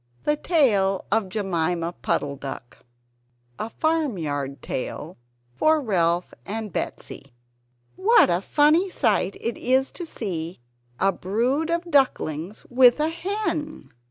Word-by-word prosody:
THE 295 Hz, -, +2 dB
TALE 215 Hz, -, +2 dB
OF 215 Hz, -2 st, +1 dB
JEMIMA 175 Hz, -4 st, -1 dB
PUDDLE 140 Hz, -1 st, -1 dB
DUCK 135 Hz, -3 st, -8 dB, 0.8 s
[A 220 Hz, -, -3 dB
Farmyard 175 Hz, -, -1 dB
Tale 155 Hz, +6 st, -5 dB, 0.4 s
for 310 Hz, -, +3 dB
Ralph 175 Hz, -, 0 dB
and 215 Hz, -, -5 dB
Betsy] -, -, -5 dB, 0.6 s
What 405 Hz, -, +5 dB
a 175 Hz, +1 st, +1 dB
funny 305 Hz, -, +3 dB
sight 215 Hz, -, +1 dB
it 230 Hz, 0 st, -3 dB
is 260 Hz, +2 st, +2 dB
to 345 Hz, -, -7 dB
see 175 Hz, -, -4 dB, 0.4 s
a 195 Hz, +1 st, +3 dB
brood 240 Hz, -, -1 dB
of 340 Hz, +1 st, -2 dB
ducklings 200 Hz, -, 0 dB
with 250 Hz, +1 st, +5 dB
a 305 Hz, +1 st, +2 dB
hen! 335 Hz, -3 st, -3 dB
220 Hz, 120 wpm, -24 LUFS, -, 0.8 s, What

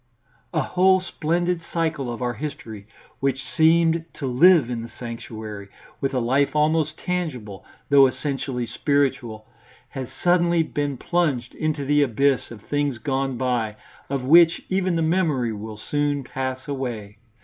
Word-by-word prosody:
A 160 Hz, -3 st, 0 dB
whole 185 Hz, +1 st, +3 dB
splendid 175 Hz, 0 st, -1 dB
cycle 155 Hz, -6 st, -1 dB
of 120 Hz, +1 st, -5 dB
our 120 Hz, 0 st, -1 dB
history 115 Hz, -6 st, -7 dB, 0.3 s
which 135 Hz, -1 st, -1 dB
seemed 160 Hz, +3 st, +3 dB
to 140 Hz, -, -5 dB
live 140 Hz, +3 st, +5 dB
in 120 Hz, -2 st, -3 dB
the 115 Hz, -, -8 dB
sanctuary, 110 Hz, -4 st, -8 dB, 0.3 s
with 135 Hz, -, -1 dB
a -, -, +2 dB
life 135 Hz, +5 st, +1 dB
almost 155 Hz, 0 st, +1 dB
tangible, 140 Hz, -, -4 dB, 0.3 s
though 140 Hz, -1 st, +7 dB
essentially 130 Hz, -1 st, -3 dB
spiritual, 125 Hz, -6 st, -1 dB, 0.4 s
has 130 Hz, -2 st, -5 dB, 0.2 s
suddenly 175 Hz, -1 st, +3 dB
been 145 Hz, -3 st, -3 dB
plunged 140 Hz, -7 st, -1 dB
into 155 Hz, -2 st, -2 dB
the 145 Hz, +1 st, +3 dB
abyss 135 Hz, +1 st, +1 dB
of 110 Hz, -3 st, -11 dB
things 145 Hz, -3 st, -1 dB
gone 135 Hz, +2 st, -2 dB
by, 120 Hz, -4 st, -1 dB, 0.3 s
of 135 Hz, -2 st, -2 dB
which 165 Hz, +5 st, +5 dB
even 185 Hz, -2 st, +1 dB
the 165 Hz, -, +1 dB
memory 155 Hz, -9 st, +1 dB
will 105 Hz, +1 st, -7 dB
soon 145 Hz, +4 st, -1 dB
pass 130 Hz, +1 st, -4 dB
away. 115 Hz, -7 st, -5 dB
140 Hz, 145 wpm, -23 LUFS, 120-160 Hz, 0.4 s, though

